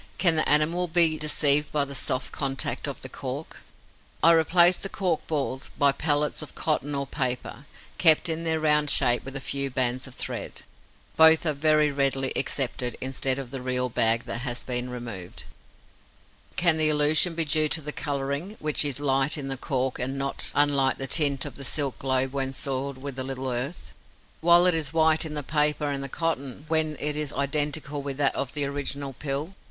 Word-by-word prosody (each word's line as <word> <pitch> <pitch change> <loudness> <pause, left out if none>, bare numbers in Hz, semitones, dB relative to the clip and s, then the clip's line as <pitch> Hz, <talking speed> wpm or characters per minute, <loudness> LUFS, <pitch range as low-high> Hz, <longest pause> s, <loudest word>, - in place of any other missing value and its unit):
Can 175 -4 +4
the 155 - +2
animal 165 +4 +3
be 165 -1 +4
deceived 150 -1 +4
by 145 -2 +1
the 140 - -9
soft 130 -1 -2
contact 135 -1 -2
of - - -6
the - - -5
cork? - - -7 0.7
I 165 - +7
replace 170 +2 +4
the 195 - -6
cork 180 -5 -2
balls 135 -4 -3
by 140 -1 +4
pellets 145 +1 -1
of 155 - -11
cotton 145 -2 -1
or 140 0 -2
paper, 130 +1 -4 0.3
kept 160 -2 +5
in 165 0 -2
their 160 -1 0
round 150 -1 +3
shape 120 -3 +4
with 135 0 -8
a - - -3
few 140 +1 -3
bands 130 0 -1
of 130 - -11
thread. - - -5 0.5
Both 160 +1 +7
are 155 - +2
very 150 +1 +2
readily 135 -1 0
accepted 125 -3 -1
instead 130 0 0
of 135 -3 -7
the 135 -2 -6
real 125 0 -1
bag 115 0 +1
that 115 - -4
has 120 -1 -4
been 125 0 -3
removed. 115 -8 -7 1.1
Can 170 -3 +3
the 155 -1 +3
illusion 155 +3 +3
be 165 -1 +2
due 155 +1 +2
to 160 - 0
the 150 0 -5
colouring, 140 +8 -4
which 150 0 0
is 145 -2 -1
light 135 +1 +1
in 135 -2 -5
the 135 - -2
cork 130 -1 -3
and 130 +2 -3
not 135 0 -3
unlike 140 -2 +2
the 135 - -4
tint 140 -1 +2
of - - -8
the 140 - -7
silk 140 0 -1
globe 130 0 0
when 135 -1 -2
soiled 135 0 -3
with 135 0 -7
a - - -1
little 130 0 -4
earth, 125 +8 -5 0.5
while 170 +1 +5
it 180 - +5
is 155 -3 0
white 160 0 +3
in 155 -1 -6
the 145 - -3
paper 150 +1 0
and 140 -1 -2
the 135 - -6
cotton, 140 -3 -4
when 155 -1 +1
it 150 0 0
is 150 -1 -2
identical 145 +1 -2
with 140 -1 -5
that 145 -1 +2
of 135 - -4
the 145 -1 +2
original 140 0 -4
pill? 145 +6 -5
140 Hz, 195 wpm, -25 LUFS, 135-155 Hz, 1.1 s, I